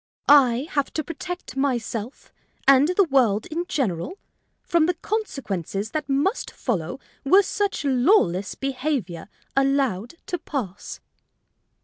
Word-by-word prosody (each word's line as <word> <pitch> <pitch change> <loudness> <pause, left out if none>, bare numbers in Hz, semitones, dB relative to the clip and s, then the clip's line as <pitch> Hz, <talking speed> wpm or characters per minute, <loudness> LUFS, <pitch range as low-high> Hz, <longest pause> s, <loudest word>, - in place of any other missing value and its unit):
"I 270 -2 +5
have 285 -2 0
to 310 - -1
protect 350 +1 -7
myself 245 -3 -3 0.3
and 275 +1 +7
the 365 +3 +3
world 250 - +2
in 340 +3 -2
general 250 - -2 0.5
from 335 -2 +2
the 355 - +1
consequences 220 - -3
that 305 0 -3
must 285 - 0
follow 180 - -3 0.2
were 380 +9 +6
such 400 -4 -2
lawless 245 - +3
behavior 260 - -3 0.3
allowed 270 - +1
to 355 - -3
pass." 235 - -5
275 Hz, 115 wpm, -24 LUFS, 225-320 Hz, 0.5 s, and